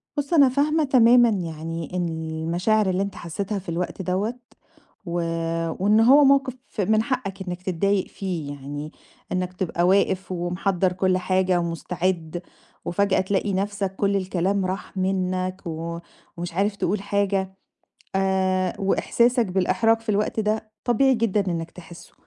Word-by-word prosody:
بُص 290 +3 -2
أنا 280 -5 +6
فاهمة 300 +4 +2
تمامًا 240 -3 +6
يعني 165 -4 -4
إن 175 -1 0
المشاعر 165 +6 0
اللي 185 +1 0
أنت 200 - -5
حسيتها 195 +4 -4
في 185 -1 -10
الوقت 175 +2 -3
دوّة، 190 +6 -1 0.7
و 175 0 -2 0.6
وإن 210 +3 +4
هو 270 +6 +7
موقف 270 -2 +4 0.3
من 215 +3 +2
حقك 195 -7 -3
إنك 180 0 -4
تضايق 190 +2 0
فيه، 170 -7 -4
يعني 145 +2 -7 0.4
إنك 185 0 -2
تبقى 175 -1 -1
واقف 190 -1 +2
ومحضّر 180 +1 0
كل 185 0 +1
حاجة 185 -1 +1
ومستعد، 170 0 -2 0.4
وفجأة 195 +1 +2
تلاقي 195 +1 -1
نفسك 195 0 -2
كل 200 0 +1
الكلام 190 +1 0
راح 190 +1 -5
منك، 185 0 -1
و 165 +1 -4 0.4
ومش 175 0 -5
عارف 200 +3 0
تقول 195 +1 -1
حاجة، 200 -1 -1 0.6
آآ، 190 -1 +1
وإحساسك 235 +4 +2
بالإحراج 195 +5 +2
في 225 - -21
الوقت 210 +1 +1
ده 215 +1 -1
طبيعي 260 +2 +3
جدًا 220 -3 +1
إنك 165 0 -4
تحسه. 170 -1 -13
190 Hz, 140 wpm, -24 LUFS, 175-210 Hz, 0.7 s, هو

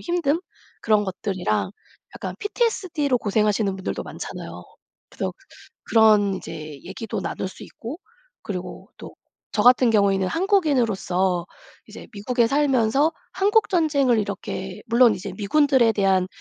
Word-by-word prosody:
힘듦? 345 -1 0 0.4
그런 215 -2 +2
것들이랑 185 - -2 0.4
약간 - - -6
PTSD로 370 - 0
고생하시는 210 -1 +1
분들도 190 - -4
많잖아요. - - -8 0.4
그래서 - - -4 0.5
그런 210 -3 +4
이제 155 -5 -8
얘기도 225 -4 -5
나눌 190 +1 -4
수 - - -13
있고 255 +9 -8 0.4
그리고 185 -3 -7
또 - - -10 0.4
저 210 - +2
같은 245 -1 +6
경우에는 195 -3 +2
한국인으로서 230 - +1 0.4
이제 - - -11
미국에 235 +3 +1
살면서 275 +2 +2 0.2
한국전쟁을 325 - +2
이렇게 195 -2 -4
물론 235 -1 +5
이제 190 +1 -6
미군들에 255 +1 +3
대한 190 -3 +2
225 Hz, 310 characters per minute, -23 LUFS, 195-285 Hz, 0.5 s, 같은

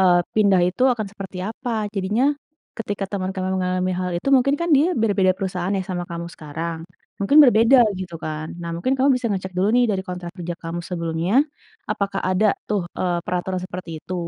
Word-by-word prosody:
eee, 180 -2 +5 0.2
pindah 200 -4 +4
itu 220 +8 -3
akan 215 -4 -3
seperti 190 -2 -8
apa? 245 +2 -5 0.2
Jadinya 215 +9 +1 0.4
ketika 205 -2 -3
teman 190 -1 -2
kamu 185 -1 -2
mengalami 185 0 0
hal 180 -1 -2
itu 275 - -4
mungkin 270 +2 +4
kan 340 - -1
dia 330 +6 +3
berbeda 200 -5 +3
perusahaan 185 -1 -2
ya 190 - -1
sama 175 -1 -2
kamu 170 0 -5
sekarang, 160 +2 -5 0.4
mungkin 200 +9 +2
berbeda 245 +1 +6 0.2
gitu 185 -2 -6
kan. 155 0 -4 0.2
Nah 170 - -4
mungkin 255 +11 0
kamu 265 +2 +3
bisa 250 -1 -2
ngecek 190 -2 -3
dulu 195 +3 +3
nih 245 0 +5
dari 190 -2 -1
kontrak 180 -1 -6
kerja 175 0 -4
kamu 165 +1 -4
sebelumnya 170 +2 -2 0.6
apakah 195 -1 -1
ada 200 +3 +3
tuh, 200 -4 0
eee, 175 -2 0
peraturan 180 +1 -2
seperti 180 -2 -7
itu. 185 - -5
185 Hz, 190 wpm, -22 LUFS, 175-210 Hz, 0.6 s, berbeda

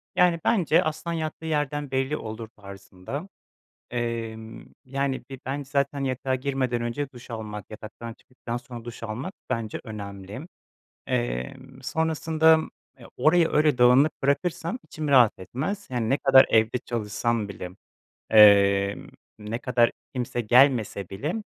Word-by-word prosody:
Yani 175 -2 +4
bence 180 -5 +3
"Aslan 155 +1 -3
yattığı 160 0 -4
yerden 145 -2 -2
belli 135 +3 0
olur." 110 +1 -7
tarzında, 100 - -9 0.6
emm, 115 -2 -4 0.2
yani, 135 0 -2
bir 135 - -8
ben 140 +2 -3
zaten 140 0 -1
yatağa 130 0 -1
girmeden 130 -3 -1
önce 120 +4 -3
duş 125 -1 -13
almak, 105 -3 -6
yataktan 110 +2 -8
çıktıktan 120 -1 -7
sonra 120 -2 -10
duş 120 -1 -8
almak 120 - -5 0.2
bence 115 -4 -3
önemli. 100 - -8 0.6
Eee, - - -2 0.3
sonrasında, 160 +2 +2 0.4
eee, - - -13
orayı 165 +1 +4
öyle 150 -3 +3
dağınık 125 +5 +6
bırakırsam 170 - 0
içim 155 -1 -6
rahat 125 -6 +5
etmez, 150 - -4
yani 120 -3 -1
ne 135 - +3
kadar 135 -1 +6
evde 110 +2 +3
çalışsam 110 -1 -2
bile, 90 -2 -7 0.6
eee, 100 -2 +6 0.4
ne 105 +2 -4
kadar 120 -2 +2 0.2
kimse 120 -1 -2
gelmese 120 -5 +3
bile 145 - -3
125 Hz, 130 wpm, -25 LUFS, 110-145 Hz, 0.6 s, dağınık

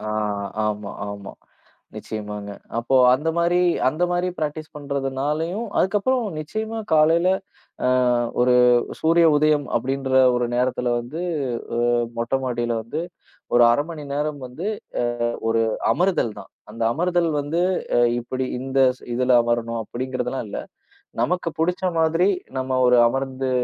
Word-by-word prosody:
அ, - - -9 0.6
ஆமா, 105 -1 -3 0.2
ஆமா. 100 -1 -8 0.6
நிச்சயமாங்க. 105 -1 -6 0.3
அப்போ, 120 +3 +1 0.2
அந்த 150 +5 -2
மாரி 175 +1 +2 0.3
அந்த 155 +6 -2
மாரி 175 +1 0
ப்ராக்டீஸ் 155 0 -4
பண்றதுனாலயும் 145 - -2
அதுக்கப்புறம், 215 +6 +1
நிச்சயமா 220 +8 -4 0.2
காலையில 165 +4 +4 0.6
அ, - - +3 0.5
ஒரு 125 0 +4 0.4
சூரிய 165 +1 +4
உதயம் 150 -1 +3
அப்படிங்கற 130 +2 -1 0.2
ஒரு 120 0 +1
நேரத்துல 125 0 0
வந்து, 130 +8 -6 0.6
அ - - -1 0.4
மொட்டைமாடியில 120 0 -1
வந்து 130 +8 -4 0.5
ஒரு 120 - +6
1/2 145 +5 +2
மணி 160 -3 -7
நேரம் 150 0 -2
வந்து 140 +10 -7 0.6
அ, - - 0 0.2
ஒரு 115 0 +2 0.3
அமர்தல் 175 - +1
தான். 95 - -12 0.2
அந்த 115 +1 -4
அமர்தல் 175 +1 +1
வந்து 145 +4 -2 0.4
அ, - - +5 0.2
இப்படி 130 +2 -3
இந்த 135 +1 -1 0.2
ஸ் - - -27
இதுல 125 +1 +2
அமரனும் 115 -1 -1
அப்படிங்கறதெல்லாம் 130 +1 -4
இல்ல. - - -4 0.6
நமக்கு 180 -1 0
புடிச்ச 180 +3 0 0.2
மாரி 165 +3 +3 0.3
நம்ம 130 0 -1
ஒரு 125 0 +5
அமர்ந்து 135 0 -2
135 Hz, 130 wpm, -22 LUFS, 120-165 Hz, 0.6 s, ஒரு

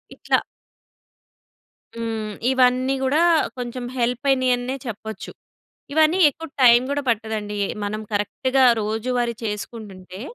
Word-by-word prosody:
ఇట్ల - - -8 1.6
హ్మ్. 225 -2 -4 0.2
ఇవన్నీ 255 +1 +3
గూడా 290 +5 +2 0.4
కొంచెం 245 0 -5
హెల్పయినయన్నె 250 0 +1
చెప్పొచ్చు. 220 -1 -7 0.6
ఇవన్నీ 315 +4 +3
ఎక్కువ 325 +4 -10
టైం 240 -1 +8
గూడా 285 0 -1
పట్టదండి. 215 -2 -3
ఎ - - -6 0.2
మనం 215 +1 -3
కరెక్ట్‌గా 260 +6 +1 0.2
రోజువారీ 235 +3 -1
చేసుకుంటుంటే 205 -3 -7
240 Hz, 100 wpm, -22 LUFS, 215-260 Hz, 1.6 s, టైం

